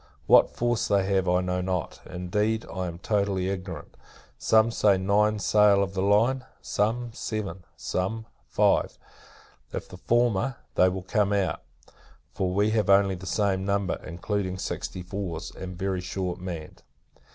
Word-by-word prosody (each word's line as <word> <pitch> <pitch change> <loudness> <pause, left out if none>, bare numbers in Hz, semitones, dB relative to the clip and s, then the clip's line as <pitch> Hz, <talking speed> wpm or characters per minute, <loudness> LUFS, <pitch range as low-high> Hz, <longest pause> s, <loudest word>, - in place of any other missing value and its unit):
What - - +6
force 120 -2 0
they 100 -2 +2
have, 95 -2 +2
I 90 +1 +3
know 90 0 -1
not; 90 -2 -3
indeed, 105 +5 -1
I 95 -1 -2
am 85 -1 -6
totally 100 -1 0
ignorant: 95 -1 -6 0.4
some 110 +1 +4
say, 105 -3 +3
nine 105 +3 +2
sail 105 -1 +4
of 95 0 -4
the 95 - -1
line; 115 +7 +3 0.2
some, 115 +3 -1
seven; 100 -6 -4
some, 110 +5 -2 0.2
five. - - +2 0.7
If - - -5
the 90 - -11
former, 120 +3 +1 0.2
they 90 - +5
will 95 0 -4
come 105 +1 +1
out; 95 -5 0 0.7
for 95 - -1
we 100 +3 +2
have 110 -3 +1
only 100 0 +5
the 95 +1 -8
same 95 -2 +1
number, 100 0 0
including 95 +2 -3
sixty 90 0 -4
fours, 90 -3 -5
and 90 -2 -8
very 95 -1 -1
shortly 90 0 -4
manned. 85 -4 -7
95 Hz, 150 wpm, -26 LUFS, 90-105 Hz, 0.7 s, What